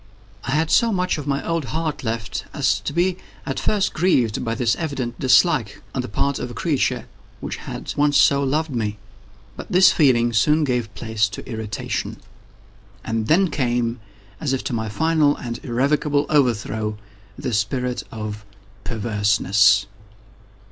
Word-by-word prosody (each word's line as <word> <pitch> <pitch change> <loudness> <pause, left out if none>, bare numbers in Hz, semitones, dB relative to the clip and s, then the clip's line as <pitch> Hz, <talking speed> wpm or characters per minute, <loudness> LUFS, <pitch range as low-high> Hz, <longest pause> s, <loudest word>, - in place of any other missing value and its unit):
I 130 - -1
had 160 +2 +1
so 230 -1 +4
much 180 -5 0
of 145 - -7
my 140 0 -1
old 165 -3 -1
heart 160 0 -3
left, 115 -2 -3
as 95 0 +2
to 100 - -4
be 180 +1 +1 0.3
at - - -3
first 205 -2 0
grieved 130 - +1
by 115 -1 -2
this 120 -1 +1
evident 135 -7 -4
dislike 130 - +3
on 130 - -1
the 125 - -6
part 140 +6 -1
of 125 - -4
a 120 - -9
creature 145 +2 0 0.3
which - - -5
had - - -6
once 145 0 +3
so 140 0 +4
loved 150 +3 0
me. 105 -4 -2 0.6
But - - -9
this 185 +1 +7
feeling 120 -6 +3
soon 150 +8 +3
gave 125 -6 -1
place 110 -2 0
to 95 - -9
irritation. 110 -4 -4 0.9
And 110 -1 -2
then 180 +1 +3
came, 120 -3 0 0.4
as 135 - -1
if 135 - -2
to - - -3
my 110 -2 -2
final 155 +3 +2
and 115 -1 -6
irrevocable 145 +4 +1
overthrow, 110 -6 +1 0.4
the 125 - -3
spirit 125 +5 -1
of 105 -1 -6 0.4
PERVERSENESS. 105 -2 +2
125 Hz, 155 wpm, -22 LUFS, 110-150 Hz, 0.9 s, this